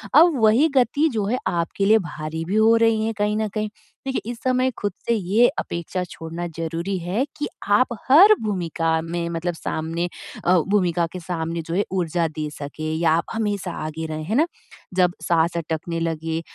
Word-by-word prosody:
अब 320 0 +7
वही 225 +8 +5
गति 270 +5 +3
जो 215 -3 0
है 235 +5 0
आपके 170 +3 -1
लिए 215 +2 +6
भारी 160 -3 -5
भी 190 +5 -2
हो 220 +1 +5
रही 225 -1 +3
है 225 - -1
कहीं 210 0 +1
न 220 0 0
कहीं। 215 +1 -3 0.4
देखिए, 265 - -1
इस 240 - -7
समय 255 0 +2
ख़ुद 205 - -1 0.2
से 235 - +3
ये 210 +4 +3
अपेक्षा 170 +2 -3
छोड़ना 165 +2 -6
ज़रूरी 165 +4 -2
है 180 +8 -1
कि 295 - -2 0.2
आप 230 +5 +5 0.2
हर 370 +10 +9
भूमिका 165 -5 0
में 170 +1 -3
मतलब 170 +1 -2
सामने 165 +1 -3 0.4
अ, 180 - +5 0.2
भूमिका 180 -4 +2
के 185 - -5
सामने 165 -1 -3
जो 165 - -3
है 200 - +2
ऊर्जा 175 -2 0
दे 155 -1 -4
सकें 150 +1 -7
या 165 -1 +3
आप 165 +1 +2
हमेशा 205 -5 -2
आगे 160 +1 -4
रहें, 155 0 -4
है 210 +7 -1
ना? 305 +5 +4 0.5
जब 180 -1 +3
साँस 170 0 +1
अटकने 165 +1 -3
लगे 165 0 -2
175 Hz, 190 wpm, -23 LUFS, 165-220 Hz, 0.5 s, हर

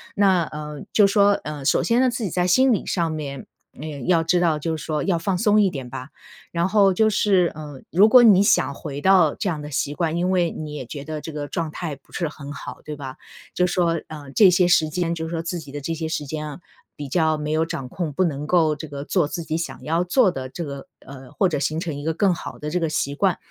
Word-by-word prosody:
那， 190 -4 +3
呃， 150 -1 -7
就 210 - +5
说， 200 0 +4
呃， 150 -2 -6
首 - - +2
先 235 +2 +2
呢， 260 - +4
自 240 -1 -4
己 200 - -1
在 180 +2 +1
心 260 +8 +4
理 210 - -2
上 170 -3 0
面， 140 -4 -5 0.3
嗯， 145 -3 -6
要 170 -2 +3
知 175 +2 +2
道 165 -3 +2
就 160 +2 -2
是 - - -8
说 155 -2 -2
要 180 -4 +1
放 185 +2 -1
松 210 +2 +4
一 200 - +3
点 135 -7 -7
吧。 130 +1 -7 0.4
然 170 +1 0
后 195 -1 +4
就 220 +3 +4
是， 190 -4 +2
嗯， 150 -3 -9
如 200 +6 +6
果 250 +1 +8
你 205 -5 +7
想 200 -7 +3
回 145 0 -7
到 180 -4 +4
这 - - -3
样 155 -4 -3
的 150 - -7
习 145 0 -2
惯， 165 0 -1
因 180 +2 0
为 175 -2 +2
你 155 -1 -7
也 150 - -5
觉 140 +3 -7
得 155 -1 -5
这 160 - -7
个 150 -1 -5
状 165 +1 -3
态 155 -2 -5
不 135 - -26
是 170 - -2
很 145 -1 -9
好， 140 - -8
对 150 - -6
吧？ 135 -1 -8 0.4
就 180 - +2
是 180 - -3
说， 170 -2 +1
呃， 145 -3 -9
这 200 +5 +6
些 180 0 +3
时 160 -3 +3
间 170 +1 -1
就 160 -1 -4
是 - - -7
说 165 -1 -2
自 175 +1 -3
己 145 -3 -11
的 145 - -5
这 145 +4 -3
些 160 0 -3
时 160 -2 -3
间 155 +2 -5
啊， 145 - -9 0.4
比 145 - -6
较 160 +2 +1
没 150 0 -4
有 160 +1 +1
掌 135 -5 -5
控， 165 +3 -4
不 185 - +1
能 150 -4 -2
够 160 -3 +3
这 155 +2 -8
个 140 -1 -6
做 150 - +1
自 170 +3 -5
己 160 0 -2
想 165 - -5
要 165 +3 0
做 190 +3 +3
的 130 -6 -6
这 170 +5 -6
个 140 -2 -8 0.2
呃， 135 -1 -11
或 195 - +2
者 150 -4 -1
形 150 +3 -1
成 165 -4 -4
一 145 - -7
个 160 +1 -1
更 195 +1 +3
好 - - -7
的 150 - -4
这 180 - 0
个 165 -2 -1
习 140 -2 -1
惯。 190 +3 +1
160 Hz, 290 characters per minute, -23 LUFS, 150-180 Hz, 0.4 s, 果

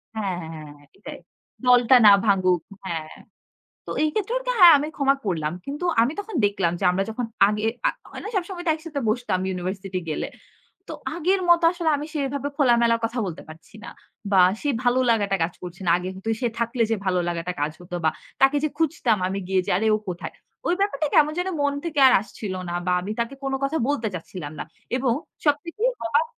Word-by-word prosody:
হ্যাঁ, 200 -4 -2
হ্যাঁ, 160 0 -8
হ্যাঁ, 155 -2 -9
হ্যাঁ, 145 - -21
এটাই। 205 - -9 0.5
দলটা 245 0 +6
না 205 - +10
ভাঙুক। 185 -4 +3 0.2
হ্যাঁ। 160 -4 -4 0.8
তো - - -6
এই 310 - +2
ক্ষেত্রে 430 +2 -2
ওকে - - -2
হ্যাঁ 350 -3 +10
আমি 290 +2 -2
ক্ষমা 275 -1 +3
করলাম। 160 -4 -1
কিন্তু 290 +5 -4 0.2
আমি 245 +6 +1
তখন 410 -1 -6
দেখলাম 195 -4 +1
যে - - -5
আমরা 195 +2 0
যখন 235 +2 -3 0.2
আগে 210 +1 -1 0.3
আ - - +5 0.2
হয় - - -9
না 420 - -5
সবসময় 360 -1 -3
তো - - +5
একসাথে 315 -2 -6
বসতাম 225 -4 0
ইউনিভার্সিটি 185 +1 -4
গেলে। 155 - -2 0.6
তো - - -6 0.2
আগের 370 +3 +1
মত 345 0 +6
আসলে 345 -2 -1
আমি 290 - -5
সেভাবে 280 -1 -2
খোলামেলার 235 -4 +3
কথা 235 +2 -3
বলতে 175 -4 -6
পারছি 160 +6 -14
না। 235 - -7 0.4
বা 190 - +6 0.2
সে 290 - -1
ভালো 245 +1 +3
লাগাটা 205 -4 +2
কাজ 170 +1 -2
করছে 180 +2 -8
না। - - +2
আগে 180 +1 -5
কিন্তু 190 +4 -6
সে 245 - +2
থাকলে 235 +1 -1
যে - - +3
ভালো 185 -1 +1
লাগাটা 175 +1 -3
কাজ 150 +1 0
হতো 175 0 -7
বা - - +5 0.3
তাকে 270 +2 +5
যে 310 - +1
খুঁজতাম 320 -8 +1
আমি 195 +1 -3
গিয়ে 190 0 +2
যে - - +1
আরে 220 +3 0
ও - - 0
কোথায়? 175 -1 -6 0.3
ওই - - +3
ব্যাপারটা 320 -7 0
কেমন 300 0 +5
যেন 360 - -1
মন 285 0 +1
থেকে 315 -4 -1
আর - - +5
আসছিল 210 -2 -7 0.2
না। - - -3
বা - - +2
আমি 195 +3 -5
তাকে 235 +3 -1
কোনো 270 0 -1
কথা 280 +4 0
বলতে 275 -6 0
চাচ্ছিলাম 165 -3 -7
না। - - -2 0.3
এবং 255 -2 +1 0.3
সবথেকে 320 +8 0 0.2
আবাক 475 - +2
230 Hz, 205 wpm, -24 LUFS, 185-290 Hz, 0.8 s, না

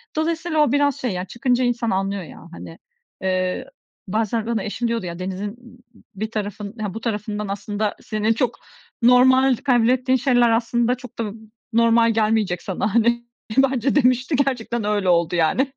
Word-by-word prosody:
Dolayısıyla 320 0 -1
o 295 -5 +4
biraz 285 -1 +2
şey 250 - -2
ya 180 0 -3
çıkınca 245 +4 0
insan 240 -2 0
anlıyor 195 0 -1
ya - - -12
hani, 165 -1 -10 0.4
eee, 185 -1 -1 0.4
bazen 220 +2 -1
bana 230 -3 -1
eşim 235 +3 -2
diyordu, 230 -4 -2
ya, 170 0 -6
denizin 190 +2 -4
b 245 0 -17 0.3
b 195 - -11
bir 220 - -9
tarafın 205 0 -5
ha 205 -3 -3
bu 225 - -6
tarafından 210 -2 -3
aslında 205 +1 -3
senin 215 +1 0
çok 235 0 -1 0.4
normal 260 +2 +5
kabul 245 -2 +2
ettiğin 255 +1 +2
şeyler 245 -2 +3
aslında 235 +1 +1
çok 250 -1 -13
da 215 -3 -2
b 225 - -12 0.4
normal 230 0 +4
gelmeyecek 215 -4 +1
sana. 200 +2 -2
Hani, 235 +1 +2 0.3
bence 265 0 +2
demişti, 255 +1 +2
gerçekten 245 -4 -1
öyle 205 -3 0
oldu, 170 0 +2
yani. 255 - +1
230 Hz, 170 wpm, -22 LUFS, 205-250 Hz, 0.4 s, normal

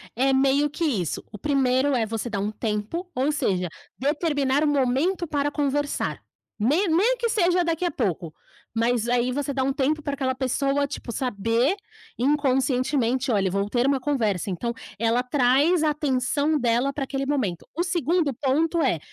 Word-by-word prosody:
é 270 +3 +2
meio 275 +2 +3
que 330 +4 -4
isso. 205 - -1
O 210 - -8
primeiro 270 +1 +2
é 225 -2 +1
você 225 +2 -4
dar 205 -3 -2
um 210 +1 -1
tempo, 220 - -3
ou 270 +4 +1
seja, 190 - 0 0.3
determinar 285 -1 +1
um - - +2
momento 290 +7 +1
para 290 -1 0
conversar, 290 0 -1 0.4
nem 305 - +2
nem 425 +10 +3
que 470 0 -1
seja 360 -4 +2
daqui 335 +1 -1
a 345 - 0
pouco. 180 - -2 0.4
Mas 235 0 +1
aí 245 +1 +1
você 280 +1 -2
dá 265 -1 0
um 275 - +1
tempo 290 +3 0
para 285 - -2
aquela 260 -2 -1
pessoa, 275 +2 0
tipo, 275 -3 -7
saber 235 - 0 0.4
inconscientemente: 260 -2 +1
"Olha, 195 -3 +2
eu 185 - -1
vou 200 +1 0
ter 245 +3 +1
uma 275 -1 +2
conversa". 220 - 0
Então, 235 +6 -2 0.3
ela 230 +2 +2
traz 285 +6 +3
a 305 - +3
atenção 290 +1 0
dela 240 +3 +1
para 275 -1 -3
aquele 270 0 -3
momento. 250 - -1
O 335 - -2
segundo 340 -4 0
ponto 310 +6 +1
é... 165 - +1
270 Hz, 175 wpm, -24 LUFS, 240-295 Hz, 0.4 s, meio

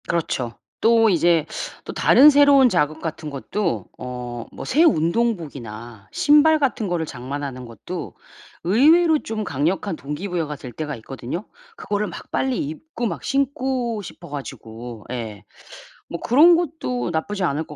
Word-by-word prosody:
그렇죠. 130 -8 -2 0.3
또 225 0 +5
이제 170 -3 +3 0.4
또 - - -6
다른 295 +3 +7
새로운 285 -2 +6
자극 155 -5 0
같은 160 -1 -5
것도 170 +7 -2
어 125 0 -6 0.3
뭐 - - -8
새 305 +5 +3
운동복이나 150 - -1
신발 300 +2 +5
같은 260 -7 0
거를 175 -3 -1
장만하는 130 -1 -6
것도 120 - -7 0.5
의외로 310 - +5
좀 220 -4 -4
강력한 175 +4 -1
동기 150 +6 -5
부여가 165 -5 -2
될 130 -3 -9
때가 150 +3 -5
있거든요. 130 - -6 0.3
그거를 210 - -2
막 - - -10
빨리 265 -2 0
입고 240 - -6
막 225 - -3
신고 260 -5 -1
싶어 170 -2 -11
가지고 120 -5 -8
예. 110 -5 -5 0.7
뭐 170 - -5
그런 310 +8 +6
것도 300 - -2
나쁘지 185 +5 -2
않을 155 -1 0
것 150 - -11
175 Hz, 285 characters per minute, -22 LUFS, -, 0.7 s, 다른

